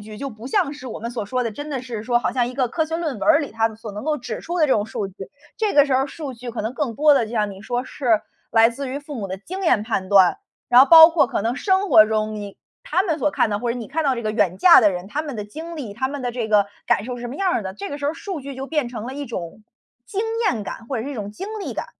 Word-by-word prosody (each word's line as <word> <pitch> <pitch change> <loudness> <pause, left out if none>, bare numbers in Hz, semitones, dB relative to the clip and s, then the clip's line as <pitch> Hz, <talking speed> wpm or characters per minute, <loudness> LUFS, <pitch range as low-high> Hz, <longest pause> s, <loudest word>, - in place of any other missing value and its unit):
据 210 0 -10
就 275 - -4
不 220 0 -10
像 275 +1 +1
是 285 -3 -10
我 235 - -6
们 230 +2 -5
所 240 -3 -4
说 250 +5 -1
的， 230 - -1
真 290 +7 -7
的 270 -3 -2
是 240 -4 -6
说 240 +1 +2
好 - - -2
像 245 -2 +1
一 - - -7
个 255 -1 0
科 320 +6 0
学 325 +1 -3
论 315 -8 -3
文 - - -9
儿 - - +7
里 290 -6 -4
它 225 0 0
所 220 -1 -9
能 210 +4 -7
够 305 -1 0
指 235 -3 -6
出 350 +1 -4
的 310 - +4
这 270 - +3
种 210 -3 +1
数 210 -2 -4
据。 190 - -17 0.4
这 430 -2 0
个 285 -1 +6
时 270 - +1
候 260 - +3
儿 270 - 0
数 280 -3 -7
据 240 +1 -7
可 230 - -5
能 225 +4 -3
更 275 -6 -2
多 295 +4 +5
地 255 - +2
就 220 - -10
像 210 -3 0
你 195 +1 -11
说 245 +2 -2
是 235 -6 +1 0.3
来 225 0 +6
自 265 +3 -5
于 265 +2 -4
父 290 0 -9
母 205 -6 -5
的 190 - -4
经 375 - -7
验 245 - +3
判 210 -4 -2
断。 190 -3 +5 0.3
然 245 +1 +7
后 270 - +7
包 325 -1 +11
括 330 -2 +3
可 215 - -2
能 235 +4 -1
生 385 0 +1
活 215 -8 +7
中 215 0 -1
你 205 -1 -7 0.3
他 360 +4 +1
们 330 -5 -1
所 300 - +1
看 235 - +1
到， 205 - -1
或 235 +1 -1
者 250 - -5
你 230 - -7
看 315 +4 -2
到 270 -2 +2
这 235 - -5
个 215 - -1
远 205 -5 +1
嫁 355 -6 +8
的 210 -4 +4
人， 180 0 -5
他 290 +7 -2
们 290 -5 -6
的 210 - -4
经 320 +11 -8
历， 250 -10 -6
他 260 - -1
们 280 +1 -5
的 245 - -1
这 235 -2 -3
个 205 -2 +4 0.2
感 205 - +2
受 250 +1 -5
是 240 - -9
什 240 - -4
么 250 - -7
样 385 +1 +1
儿 - - 0
的， 190 -1 -5
这 200 0 -6
个 285 - -5
时 285 - -6
候 295 - 0
数 375 -4 -6
据 275 +1 -8
就 265 +1 -6
变 300 -4 -1
成 230 -3 -7
了 260 - -6
一 290 - -5
种 185 -2 -7 0.4
经 405 -1 -3 0.3
验 225 - 0
感， 225 - -7
或 265 - -2
者 220 - -3
是 280 - -5
一 285 - -5
种 205 -3 -5
经 385 - -7
历 - - -4
感。 - - -4
245 Hz, 350 characters per minute, -22 LUFS, 215-290 Hz, 0.4 s, 包